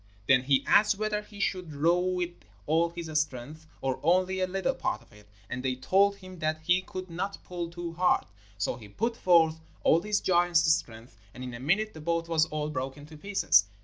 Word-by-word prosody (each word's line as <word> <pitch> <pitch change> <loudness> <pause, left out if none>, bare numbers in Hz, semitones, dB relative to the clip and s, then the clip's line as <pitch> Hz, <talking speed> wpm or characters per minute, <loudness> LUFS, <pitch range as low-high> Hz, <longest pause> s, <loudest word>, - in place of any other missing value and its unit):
Then 130 -1 +6
he 135 +1 +2
asked 210 -1 +4
whether 215 0 -1
he 210 -1 -14
should 180 -7 -2
row 165 +5 +3
with 180 -1 -1 0.3
all 165 +3 +2
his 170 0 -7 0.2
strength, 155 +3 -7
or 130 -1 -1
only 185 +3 +2
a 185 - +1
little 190 +1 -1
part - - -2
of - - -24
it, 105 0 -17 0.2
and 125 +3 -4
they 130 -1 -1
told 195 +10 +3
him 185 -2 -12
that 155 0 -1
he 180 +3 +3
could 185 0 -7
not 195 +4 -3
pull 175 -2 -5
too 170 -1 -6
hard. 180 +2 +2 0.3
So 100 +4 -1
he 110 -4 -12
put 230 - -2
forth 165 -5 +4 0.2
all 165 - +4
his 210 +1 0
giant's 175 -2 +3
strength, 115 -5 -5 0.2
and 125 - -7
in 125 -1 -6
a 120 - -7
minute 195 +11 +1
the 155 - -10
boat 170 +1 -1
was 160 -1 +2
all 150 0 -3
broken 135 +1 -5
to 155 +1 -13
pieces. 190 - +3
170 Hz, 210 wpm, -28 LUFS, 145-185 Hz, 0.3 s, Then